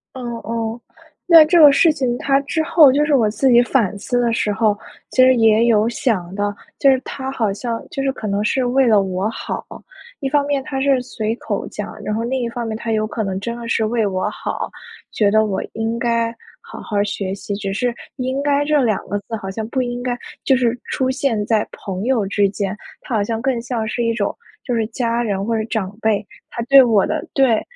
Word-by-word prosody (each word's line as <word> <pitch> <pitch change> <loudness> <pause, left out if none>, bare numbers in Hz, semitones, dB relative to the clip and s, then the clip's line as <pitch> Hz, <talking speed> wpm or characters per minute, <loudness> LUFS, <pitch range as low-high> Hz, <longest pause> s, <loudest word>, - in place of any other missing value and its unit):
哦 260 - -6 0.2
哦。 230 +1 -3 0.5
那 330 -2 +10
这 340 +3 +4
个 295 -3 +9
事 325 +3 +5
情 255 -5 -1
它 275 0 +2
之 300 +3 -1
后 320 -4 +6
就 295 +3 +2
是 295 - +3
我 225 -5 +3
自 245 +5 +1
己 240 0 +6
反 230 -6 0
思 245 +4 -1
的 235 -1 +1
时 215 -2 0
候， 210 0 +1 0.3
其 255 - +3
实 255 0 +6
也 225 -1 +4
有 220 -2 +3
想 195 -7 -1
到， 205 0 -1 0.2
就 275 - +5
是 265 -1 +4
他 265 -1 -5
好 220 -6 0
像 230 +3 -4
就 275 - -3
是 270 0 +1
可 220 - -6
能 200 0 0
是 260 +4 +1
为 255 +1 +3
了 210 -3 +5
我 190 +2 -2
好。 230 - -5 0.6
一 270 - -1
方 285 0 +2
面 280 -2 0
他 265 0 -4
是 275 -2 +2
随 225 -3 -3
口 - - -4
讲， - - -6
然 210 - -2
后 225 - -2
另 260 +2 -1
一 240 - -1
方 235 0 -4
面 220 -1 -3
他 230 0 -4
有 215 0 +1
可 220 0 -3
能 190 -1 -3
真 235 +3 -4
的 235 - -7
是 230 - +1
为 225 -1 0
我 185 -1 -1
好， - - -5 0.4
觉 210 -2 +2
得 220 +1 +3
我 195 -2 -2
应 225 +1 -2
该 230 -1 0 0.3
好 - - -11
好 205 -2 -1
学 195 -2 -3
习， 200 +1 -6
只 200 -1 -4
是 245 +3 -1 0.2
应 260 +1 -2
该 285 0 +2
这 300 -1 +2
2 220 -5 +1
个 205 - -1
字 215 +3 -6
好 195 -3 -6
像 220 +2 -5
不 260 +2 -1
应 245 0 -3
该 245 -1 -2 0.3
就 265 - +4
是 245 -1 0
出 260 0 -1
现 250 -6 -1
在 215 -1 +1
朋 195 +1 -5
友 245 -6 +1
之 200 0 +1
间， 200 0 -3 0.3
他 240 - -4
好 210 - +2
像 225 +1 -3
更 255 -2 0
像 235 -2 -3
是 220 +3 -3
一 230 -1 +1
种 210 -3 -1 0.3
就 250 - -3
是 225 -2 0
家 235 0 -1
人 200 -4 -2
或 230 0 0
者 220 - -1
长 215 -4 -3
辈， 215 -2 +1 0.2
他 235 - -4
对 275 +3 +7
我 225 -6 +3
的 - - -3
对 255 -5 +3
230 Hz, 250 characters per minute, -19 LUFS, 210-260 Hz, 0.6 s, 那